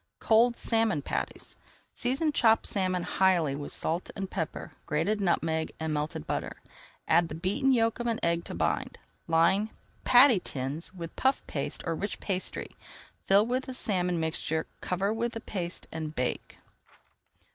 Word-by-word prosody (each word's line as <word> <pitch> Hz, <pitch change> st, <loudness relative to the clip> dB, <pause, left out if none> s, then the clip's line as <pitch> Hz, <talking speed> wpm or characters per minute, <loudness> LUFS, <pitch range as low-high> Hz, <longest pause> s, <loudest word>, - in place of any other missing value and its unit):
COLD 235 Hz, +2 st, +4 dB
SALMON 225 Hz, -10 st, +1 dB
PATTIES -, -, -4 dB, 0.4 s
Season 270 Hz, +6 st, 0 dB
chopped 225 Hz, -6 st, +4 dB
salmon 185 Hz, -3 st, 0 dB
highly 175 Hz, -8 st, +2 dB
with 145 Hz, 0 st, -6 dB
salt 165 Hz, +3 st, -2 dB
and 195 Hz, -1 st, -4 dB
pepper, 160 Hz, -, -4 dB, 0.2 s
grated 180 Hz, +8 st, 0 dB
nutmeg 160 Hz, -3 st, 0 dB
and 160 Hz, -1 st, -2 dB
melted 150 Hz, -, -3 dB
butter. -, -, -3 dB, 0.5 s
Add 170 Hz, +1 st, +4 dB
the 150 Hz, -, -5 dB
beaten 195 Hz, -, +1 dB
yolk 230 Hz, -2 st, +2 dB
of 240 Hz, -, -2 dB
an 230 Hz, -1 st, 0 dB
egg 170 Hz, 0 st, +2 dB
to -, -, -6 dB
bind. 80 Hz, -2 st, -1 dB, 0.3 s
Line 170 Hz, +6 st, +3 dB, 0.3 s
patty 250 Hz, -3 st, +7 dB
tins 140 Hz, +1 st, -4 dB
with 170 Hz, -3 st, -8 dB
puff 265 Hz, +1 st, +1 dB
paste -, -, -4 dB
or 165 Hz, -, 0 dB
rich 200 Hz, +5 st, -4 dB
pastry, 190 Hz, -2 st, -4 dB, 0.5 s
fill 200 Hz, +2 st, +6 dB
with 255 Hz, +2 st, -1 dB
the 260 Hz, -, -4 dB
salmon 180 Hz, -7 st, +1 dB
mixture, 160 Hz, 0 st, -1 dB, 0.2 s
cover 195 Hz, +3 st, 0 dB
with 235 Hz, +2 st, -2 dB
the 225 Hz, -, -4 dB
paste, 180 Hz, -5 st, -4 dB
and 155 Hz, -1 st, -5 dB
bake. 125 Hz, 0 st, -3 dB
185 Hz, 155 wpm, -29 LUFS, 160-225 Hz, 0.5 s, patty